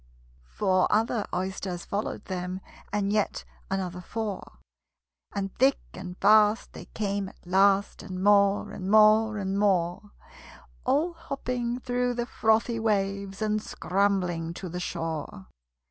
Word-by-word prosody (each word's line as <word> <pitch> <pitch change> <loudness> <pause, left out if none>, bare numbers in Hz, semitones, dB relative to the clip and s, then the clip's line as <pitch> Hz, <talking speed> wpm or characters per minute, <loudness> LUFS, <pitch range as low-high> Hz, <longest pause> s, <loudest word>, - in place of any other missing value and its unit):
Four 185 - +2
other 220 0 +1
Oysters 185 -1 -3
followed 205 +2 -3
them, 185 -1 -4 0.3
And 205 0 0
yet 210 -1 0 0.2
another 180 -2 -3
four; 210 +1 -5 0.8
And 195 -1 -3
thick 270 +2 +5 0.2
and 180 -1 -8
fast 210 +1 +4
they - - -9
came 200 -2 -3
at - - -22
last, 195 +2 +3
And 185 -1 -6
more, 200 0 +4
and 190 0 -5
more, 215 +1 +5
and 195 0 -1
more 185 -1 +1 0.8
All 300 +7 +2
hopping 250 -6 -3
through 245 0 0
the 240 0 -1
frothy 225 0 +1
waves, 200 -2 -1
And 215 0 0
scrambling 180 -5 -1
to 185 - -6
the 180 +2 -4
shore. 160 - -4
200 Hz, 130 wpm, -27 LUFS, 185-220 Hz, 0.8 s, thick